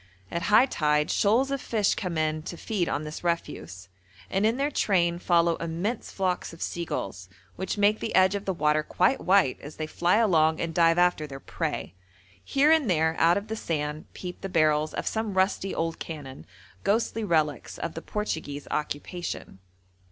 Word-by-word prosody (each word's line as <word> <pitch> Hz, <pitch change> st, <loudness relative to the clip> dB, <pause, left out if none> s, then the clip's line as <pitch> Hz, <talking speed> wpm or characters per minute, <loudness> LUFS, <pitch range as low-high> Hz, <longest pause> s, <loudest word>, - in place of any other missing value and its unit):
At 170 Hz, -, -2 dB
high 215 Hz, +5 st, +7 dB
tide 150 Hz, -, +1 dB
shoals 240 Hz, +7 st, +2 dB
of 275 Hz, -1 st, -1 dB
fish 215 Hz, -4 st, +1 dB
come 180 Hz, -4 st, -3 dB
in 155 Hz, 0 st, 0 dB
to 170 Hz, -, -7 dB
feed 190 Hz, -4 st, -1 dB
on 145 Hz, -, -1 dB
this 150 Hz, +2 st, -7 dB
refuse, 95 Hz, -, -3 dB, 0.4 s
and 195 Hz, +3 st, +2 dB
in 230 Hz, +2 st, +1 dB
their 285 Hz, +2 st, 0 dB
train 175 Hz, -8 st, +1 dB
follow 170 Hz, -2 st, +3 dB
immense 170 Hz, +8 st, -3 dB
flocks 185 Hz, -3 st, -2 dB
of 165 Hz, -, -13 dB
seagulls, 100 Hz, -, -4 dB, 0.3 s
which 190 Hz, +3 st, -3 dB
make 205 Hz, +1 st, +3 dB
the -, -, -3 dB
edge 185 Hz, +1 st, +5 dB
of 200 Hz, 0 st, -3 dB
the 195 Hz, -, 0 dB
water 150 Hz, -2 st, +2 dB
quite 185 Hz, -, +1 dB
white 185 Hz, -8 st, +3 dB
as 145 Hz, +2 st, -9 dB
they 155 Hz, -, -3 dB
fly 175 Hz, +4 st, +1 dB
along 160 Hz, -8 st, +3 dB
and 165 Hz, -1 st, -2 dB
dive 165 Hz, 0 st, +4 dB
after 175 Hz, -4 st, +2 dB
their 135 Hz, -1 st, -8 dB
prey. -, -, -4 dB, 0.5 s
Here 285 Hz, +3 st, +3 dB
and 315 Hz, -8 st, +4 dB
there 160 Hz, -2 st, +2 dB
out 170 Hz, +2 st, +5 dB
of 200 Hz, +1 st, -4 dB
the 220 Hz, -, -3 dB
sand 150 Hz, -6 st, -3 dB
peep 180 Hz, -1 st, -7 dB
the 195 Hz, -, -4 dB
barrels 155 Hz, -3 st, +2 dB
of -, -, -3 dB
some 220 Hz, -3 st, -2 dB
rusty 190 Hz, 0 st, +1 dB
old 165 Hz, 0 st, -2 dB
cannon, 145 Hz, -5 st, -8 dB, 0.4 s
ghostly 225 Hz, +2 st, +1 dB
relics 155 Hz, -7 st, 0 dB
of 170 Hz, -, -4 dB
the 165 Hz, -, -6 dB
Portuguese 160 Hz, -10 st, -4 dB
occupation. 150 Hz, -, -4 dB
170 Hz, 180 wpm, -27 LUFS, 155-200 Hz, 0.5 s, high